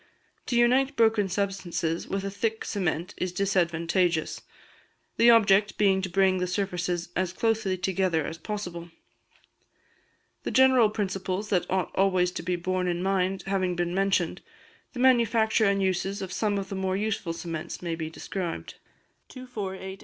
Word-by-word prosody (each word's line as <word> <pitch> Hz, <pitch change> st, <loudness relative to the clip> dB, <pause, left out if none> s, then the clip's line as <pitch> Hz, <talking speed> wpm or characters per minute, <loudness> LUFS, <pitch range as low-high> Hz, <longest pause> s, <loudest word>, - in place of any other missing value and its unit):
To 245 Hz, -, -1 dB
unite 260 Hz, +4 st, +3 dB
broken 220 Hz, -4 st, +3 dB
substances 185 Hz, -4 st, -2 dB
with 195 Hz, 0 st, -2 dB
a 195 Hz, -, -3 dB
thick 220 Hz, +2 st, -2 dB
cement 175 Hz, -4 st, -2 dB
is 185 Hz, -, -2 dB
disadvantageous, 175 Hz, -2 st, 0 dB, 0.8 s
the 235 Hz, -, +6 dB
object 210 Hz, -3 st, +5 dB
being 195 Hz, -2 st, +3 dB
to 190 Hz, -, -3 dB
bring 190 Hz, 0 st, +3 dB
the 180 Hz, -, -1 dB
surfaces 180 Hz, -2 st, -2 dB
as 185 Hz, -1 st, 0 dB
closely 220 Hz, -2 st, 0 dB
together 185 Hz, -4 st, 0 dB
as 165 Hz, -, -6 dB
possible. 175 Hz, -3 st, -5 dB, 1.5 s
The -, -, -4 dB
general 255 Hz, -2 st, +5 dB
principles 195 Hz, -1 st, -3 dB
that 180 Hz, -3 st, 0 dB
ought 190 Hz, -2 st, 0 dB
always 185 Hz, -2 st, +2 dB
to 180 Hz, -, -5 dB
be 180 Hz, +1 st, -1 dB
borne 185 Hz, +1 st, -1 dB
in 175 Hz, 0 st, -1 dB
mind 190 Hz, -1 st, 0 dB
having 190 Hz, -2 st, 0 dB
been 175 Hz, 0 st, -1 dB
mentioned, 190 Hz, -3 st, 0 dB, 0.5 s
the 250 Hz, -, -7 dB
manufacture 230 Hz, -3 st, +3 dB
and 200 Hz, -1 st, +2 dB
uses 190 Hz, +2 st, -1 dB
of 185 Hz, -1 st, -6 dB
some 210 Hz, -2 st, 0 dB
of 195 Hz, -1 st, -4 dB
the 195 Hz, -, -4 dB
more 190 Hz, 0 st, -1 dB
useful 205 Hz, -4 st, -2 dB
cements 165 Hz, 0 st, -6 dB
may 170 Hz, -1 st, -2 dB
be 160 Hz, -1 st, -4 dB
described. 175 Hz, +1 st, -5 dB
190 Hz, 150 wpm, -27 LUFS, 180-205 Hz, 1.5 s, the